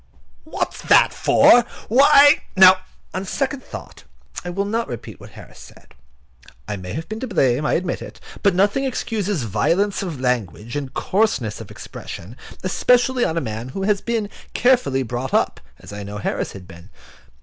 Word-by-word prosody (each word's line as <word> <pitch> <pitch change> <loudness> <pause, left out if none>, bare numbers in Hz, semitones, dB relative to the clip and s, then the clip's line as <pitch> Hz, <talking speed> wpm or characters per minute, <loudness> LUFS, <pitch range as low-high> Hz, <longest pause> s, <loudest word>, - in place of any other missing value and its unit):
"What's 315 - -4
that - - +5
for? 240 - +5 0.2
Why—" 285 +4 +6 0.2
No, 185 0 +9 0.4
on 185 - -3
second 270 +6 -3
thoughts, - - -10 0.4
I 175 - -5
will 195 +3 -2
not 225 +3 -2
repeat 120 - -8
what - - -12
Harris - - -13
said. - - -16 0.7
I 105 - -3
may 90 -2 -7
have 160 +1 -5
been 220 +1 -6
to 260 - -4
blame, 145 - +1
I - - +1
admit 175 0 -1
it; - - -10 0.2
but 200 -3 +3
nothing 200 +8 +2
excuses 210 - -2
violence 170 - 0
of 170 -8 -5
language 120 - -2
and 140 -2 -4
coarseness 135 - -1
of - - -10
expression, 95 +8 -9 0.3
especially 250 +6 +2
in 160 - -2
a - - +1
man 115 0 -5
who 190 +9 -5
has 205 0 +1
been 225 -3 -2 0.2
carefully 245 - +2
brought 125 +2 -3
up, - - +1 0.2
as 100 - -12
I 105 - -6
know 100 +1 -7
Harris 105 - -3
has 95 - -10
been. 85 +2 -14
185 Hz, 170 wpm, -21 LUFS, -, 0.7 s, No